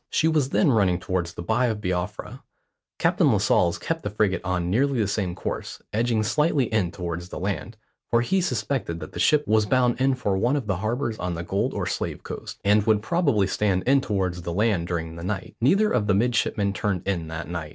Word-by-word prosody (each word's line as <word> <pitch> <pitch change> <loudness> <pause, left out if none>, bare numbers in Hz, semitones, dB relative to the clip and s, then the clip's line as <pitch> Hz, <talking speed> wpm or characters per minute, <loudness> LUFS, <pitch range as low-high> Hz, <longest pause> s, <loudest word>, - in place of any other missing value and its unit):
She 160 - +2
was 150 -5 +2
then 150 0 +3
running 95 -7 +2
towards 90 -2 -3
the - - -6
Bight 125 +8 +1
of 110 -3 -2
Biafra. 90 -3 -4 0.6
Captain - - +3
Lascelles 85 -1 +2
kept 165 0 -3
the - - -3
frigate 100 -1 0
on 90 -2 -1
nearly 135 +5 +2
the 105 - +2
same 95 -4 -2
course, - - -5
edging 115 0 +1
slightly 150 +5 +2
in 100 -5 +2
towards 85 -1 -5
the - - -7
land, 100 +4 -3 0.3
for 115 - +3
he 190 +11 +1
suspected 125 - -2
that 75 - -8
the - - -7
ship 150 -1 +3
was 110 0 +3
bound 125 0 +2
in 135 0 +3
for 105 -6 -1
one 120 +8 +1
of 140 -5 -2
the 95 -3 -1
harbours 115 +3 -2
on 90 -1 -2
the 85 - -4
Gold 95 +3 -1
or - - -1
Slave - - -3
Coast, - - -7
and 105 +1 +5
would 105 -1 +3
probably 145 - +2
stand 95 -1 0
in 135 +1 +4
towards 95 -6 -2
the 85 0 -4
land 100 -3 +1
during 80 -1 -4
the 85 - -7
night. 95 0 -4
Neither 200 - +3
of 110 -4 +1
the 100 - +3
midshipmen 105 -2 +1
turned 95 -1 -2
in 85 -5 -1
that 80 -1 -6
night. 85 -3 -5
105 Hz, 215 wpm, -25 LUFS, 90-125 Hz, 0.6 s, and